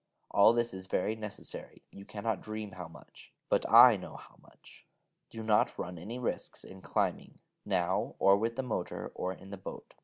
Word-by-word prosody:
All 100 +3 +6
this 120 -2 0
is 95 0 -7
very 105 +4 0
necessary: 105 -2 -8
you 100 - -11
cannot 105 -1 -3
dream 110 -1 -6
how 90 -2 -7
much: 80 - -16 0.2
but - - +1
I - - +9
know - - -9
how - - -13
much. - - -19 0.4
Do 115 - -7
not 110 -1 +2
run 90 -1 -5
any 110 +8 -6
risks 125 - -3
in 95 0 -12
climbing, - - -2 0.3
now, 85 -1 0
or 100 - +6
with 115 +3 -1
the 135 - -2
motor, 125 - -4
or 90 - -2
in 95 +1 -11
the 100 - -6
boat... - - -9
100 Hz, 185 wpm, -31 LUFS, 95-110 Hz, 0.4 s, I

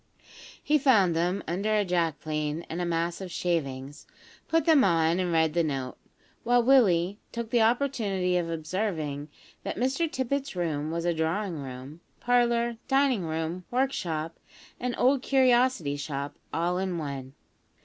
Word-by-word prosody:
He 300 0 +3
found 210 - +4
them 175 +4 0
under 200 +6 0
a 210 -1 +2
jack 170 -5 0
plane 155 +1 -3
and 170 +2 -3
a - - 0
mass 170 +2 -1
of 190 - -6
shavings; 145 -6 -3 0.4
put 330 0 +2
them 315 -5 +6
on 165 -1 +3
and 180 -2 0
read 160 -2 +2
the 170 0 +2
note, 135 -4 -3 0.5
while 245 0 +3
Willie 205 -7 +4
took 235 -1 -5
the 240 - +3
opportunity 220 -7 +1
of 175 -2 0
observing 160 -3 -3 0.3
that - - -5
Mr 270 +7 0
Tippet's 270 -1 -2
room 155 -4 -2
was 165 +1 -3
a 175 - +2
drawing 165 +2 -1
room, 135 +4 -8 0.2
parlour, 240 -1 +2
dining 270 -8 +2
room, 160 +3 -3
workshop, 170 - -2 0.4
and 250 0 -2
old 260 +1 +3
curiosity 250 - +3
shop, 140 -1 -4 0.2
all 175 +2 0
in 185 -2 -2
one. 140 -3 -6
175 Hz, 150 wpm, -27 LUFS, 160-240 Hz, 0.5 s, them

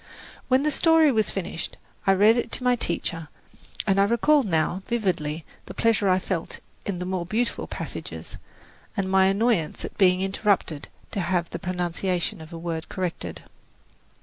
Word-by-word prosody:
When 260 +2 +3
the 300 - +2
story 325 -1 +5
was 220 -3 +2
finished, 170 -3 -4 0.3
I 195 - +7
read 210 +4 +6
it 240 - -1
to - - -3
my 250 0 +4
teacher, 170 -6 -2 0.6
and 195 -1 +3
I 200 - +6
recall 235 +7 +4
now 175 - 0
vividly 170 -9 -1 0.2
the - - -8
pleasure 225 -3 +2
I 185 - +5
felt 185 -3 -3 0.3
in 200 -3 -1
the 180 - -4
more 185 -1 -1
beautiful 225 +7 -1
passages, - - -6 0.6
and 195 -1 0
my 190 0 +4
annoyance 195 -4 +1
at - - -8
being 185 -1 +5
interrupted 195 -6 0 0.2
to - - -2
have 175 -1 0
the 170 - -4
pronunciation 180 +1 -2
of 160 +1 -11
a 165 - -6
word 165 -1 -4
corrected. 180 -3 -4
190 Hz, 165 wpm, -25 LUFS, 170-220 Hz, 0.6 s, I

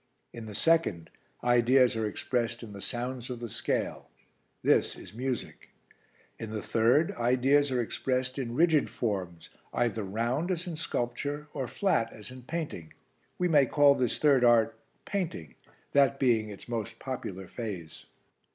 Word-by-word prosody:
In 115 -1 -8
the 105 - -8
second, 160 - +2 0.3
ideas 120 +1 +4
are 110 -1 0
expressed 120 +2 -2
in 105 -3 -9
the 100 - -9
sounds 125 +1 -4
of 125 -2 -5
the 120 -3 -6
scale; - - -2 0.5
this - - +3
is - - -12
music. 125 +1 -4 0.7
In 110 - -5
the 110 -1 -4
third, 120 +8 +3
ideas 130 +4 +3
are 125 - +1
expressed 130 +2 -1
in 120 -3 -3
rigid 160 0 +4
forms 90 -7 -3 0.3
either 115 -2 +1
round, 120 - -1
as 180 -2 -2
in 175 -3 -4
sculpture, 145 +1 -3
or 135 -3 -3
flat, 120 - +1
as 110 +3 -10
in 130 0 -10
painting. 140 - -5 0.4
We 180 - +1
may 145 -5 +5
call 145 +1 +6
this 125 -3 0
third 140 -4 +4
art 115 -2 +5 0.3
painting, 170 - -3 0.4
that 140 -1 +4
being 115 -5 +2
its 100 - -10
most 115 -3 -4
popular 100 -8 -5
phase." 95 -9 -7
120 Hz, 150 wpm, -29 LUFS, 110-140 Hz, 0.7 s, call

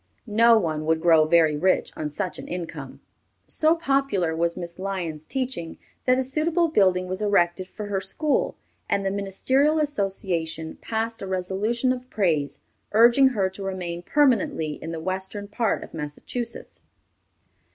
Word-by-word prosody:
No 230 +1 +5
one 155 -6 -1
would 160 0 +2
grow 160 -2 +5
very 160 -2 +4
rich 185 +5 +1
on 155 -1 -3
such 180 +5 -3
an - - -8
income. 175 -2 -6 0.4
So 315 +1 +2
popular 275 - 0
was 170 +1 0
Miss 170 0 -7
Lyon's 175 -6 -4
teaching 255 -11 -3 0.3
that 255 0 +4
a 260 - +1
suitable 315 +6 +1
building 185 -9 +3
was 185 +2 -3
erected 185 -3 +2
for 210 +2 -7
her 200 -2 -2
school, 305 - 0 0.3
and 200 -1 0
the 195 - +1
Ministerial 260 +10 +1
Association 190 - -2
passed 225 0 -3
a 195 - -5
resolution 200 +7 0
of 255 0 -9
praise, 160 -8 0 0.4
urging 235 +5 +6
her 210 -7 +1
to 190 - -10
remain 180 -3 -4
permanently 225 - +2
in 165 - -5
the 165 - -4
western 190 +4 -3
part 220 +2 -1
of - - -12
Massachusetts. 160 +11 -5
195 Hz, 150 wpm, -24 LUFS, 170-240 Hz, 0.4 s, urging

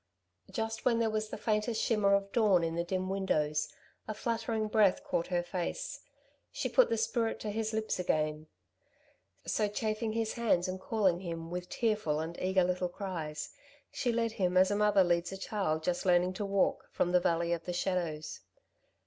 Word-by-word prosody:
Just 225 -2 -3
when 240 -2 +3
there 225 -1 +1
was 215 0 -2
the - - -5
faintest 215 +1 0
shimmer 205 -3 +3
of 200 0 -1
dawn 205 -7 +4
in 165 0 -1
the 170 +1 -1
dim 185 +1 -2
windows, 155 -6 0 0.4
a 215 - -4
fluttering 225 -1 -1
breath 215 +4 +3
caught 275 - -1
her 175 -1 0
face. 185 - -4 0.5
She - - -2
put - - +5
the 230 - +1
spirit 225 +1 0
to 210 - -3
his 220 +1 -2
lips 220 -3 -2
again. 155 -3 0 1.0
So, 215 - +1
chafing 215 +1 -2
his 225 -1 -1
hands 205 -6 +1
and 185 0 -4
calling 190 -6 +1
him, 165 -2 -6
with 180 0 -4
tearful 215 -10 0
and 165 +2 -4
eager 185 0 +3
little 180 0 0
cries, 170 -5 -5 0.4
she 245 - 0
led 230 -1 0
him 185 -4 0
as 185 +2 +5
a - - +2
mother 205 -2 +4
leads 175 0 +1
a 195 - -5
child 190 -6 -1
just 175 +1 -1
learning 180 0 +3
to 205 +2 -3
walk, 200 -1 +1
from 175 - 0
the 180 - +5
valley 170 0 +1
of 170 -1 -4
the 180 - -2
shadows. 175 -4 -2
190 Hz, 185 wpm, -32 LUFS, 175-220 Hz, 1.0 s, put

